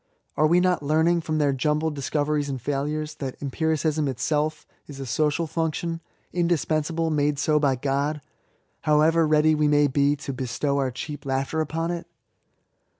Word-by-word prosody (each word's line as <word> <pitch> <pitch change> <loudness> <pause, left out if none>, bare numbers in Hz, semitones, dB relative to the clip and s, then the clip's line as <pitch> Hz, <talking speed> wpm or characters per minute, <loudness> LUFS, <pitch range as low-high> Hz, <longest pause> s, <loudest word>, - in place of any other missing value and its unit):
Are 155 - +4
we 170 +3 +4
not 180 -2 +2
learning, 160 +4 +2
from 155 -1 -2
their 145 -2 +2
jumbled 150 +3 0
discoveries 145 +1 -1
and 135 -2 -3
failures, 150 +4 -2
that 135 -3 -4
empiricism 155 +1 0
itself 150 +4 -1 0.2
is 140 -2 -9
a 135 - -5
social 150 +6 0
function, 165 +1 -2 0.3
indispensable, 165 -1 0
made 145 -1 +1
so 150 +2 +2
by 140 -3 +2
God, 140 +3 -1 0.7
however 155 +2 +4
ready 155 +1 +4
we 150 -1 +2
may 145 0 +4
be 140 +1 +2
to 140 -1 -6
jbestow 130 +3 -1
our 135 -2 +1
cheap 145 +3 -6
laughter 135 +3 -1
upon 165 +2 -2
it 170 0 -5
150 Hz, 155 wpm, -25 LUFS, 140-160 Hz, 0.7 s, Are